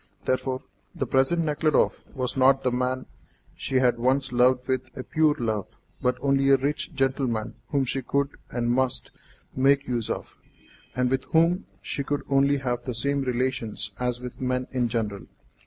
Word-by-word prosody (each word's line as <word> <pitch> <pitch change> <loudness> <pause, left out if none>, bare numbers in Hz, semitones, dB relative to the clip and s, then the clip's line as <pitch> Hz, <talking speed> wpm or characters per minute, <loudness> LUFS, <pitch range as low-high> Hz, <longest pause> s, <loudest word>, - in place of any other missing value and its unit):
Therefore, 130 0 -1 0.3
the - - -1
present 145 +6 +2
Nekhludoff 155 0 +2
was 130 -2 -2
not 135 +1 +4
the 125 - +2
man 130 +1 -1 0.5
she 135 - -4
had 125 -2 +3
once 130 +2 +1
loved 125 +1 +3
with 130 -1 +1 0.2
a 130 - -4
pure 155 +1 +2
love, 110 -6 -3 0.2
but 125 0 +1
only 135 0 +3
a 135 - +7
rich 145 +4 -2
gentleman 130 -5 0
whom 140 -2 +1
she 135 +2 -2
could, 140 +3 0 0.2
and 120 -1 -1
must, 125 -1 0 0.4
make 140 +2 +3
use 120 -3 -1
of, - - -4 0.6
and 125 0 +1
with 130 0 0
whom 170 +4 +2 0.2
she 140 - -3
could 145 +1 -2
only 140 +1 +4
have 125 -3 -2
the 125 -2 -4
same 140 +4 0
relations 125 -5 -2
as 125 -1 -1
with 125 0 -8
men 125 0 0
in 125 -2 +1
general. 110 -4 -3
130 Hz, 170 wpm, -26 LUFS, 125-140 Hz, 0.6 s, a